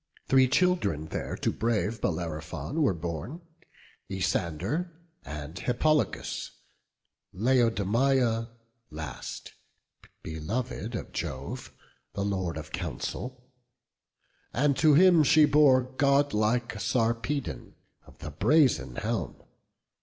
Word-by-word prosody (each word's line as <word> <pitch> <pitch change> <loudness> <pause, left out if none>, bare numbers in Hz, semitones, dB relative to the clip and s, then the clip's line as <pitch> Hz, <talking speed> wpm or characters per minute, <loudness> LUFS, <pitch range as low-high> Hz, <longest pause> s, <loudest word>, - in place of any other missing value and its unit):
Three 130 -1 +5
children 140 - +1
there - - -4
to - - -1
brave 110 -1 -1
Bellerophon 80 - -3
Were 130 - +3
born; 85 - -5 0.7
Isander, 95 - -1 0.3
and 75 +3 -7
Hippolochus, 150 +8 0 0.9
Laodamia 115 +1 +2 0.4
last, 75 -4 -7 0.7
belov'd 110 +8 -4
of - - -6
Jove, 70 -5 -5 0.4
The 100 - -2
Lord 95 -5 -2
of 80 -1 -8
counsel; 125 0 -5 1.1
and 140 +2 +2
to 155 -2 +5
him 175 0 +7
she 155 +1 +6
bore 140 -4 +5
Godlike 125 -4 +1
Sarpedon 115 +6 -1 0.3
of - - -17
the 75 - -7
brazen 125 - +2
helm. - - -2
115 Hz, 95 wpm, -28 LUFS, 85-140 Hz, 1.1 s, him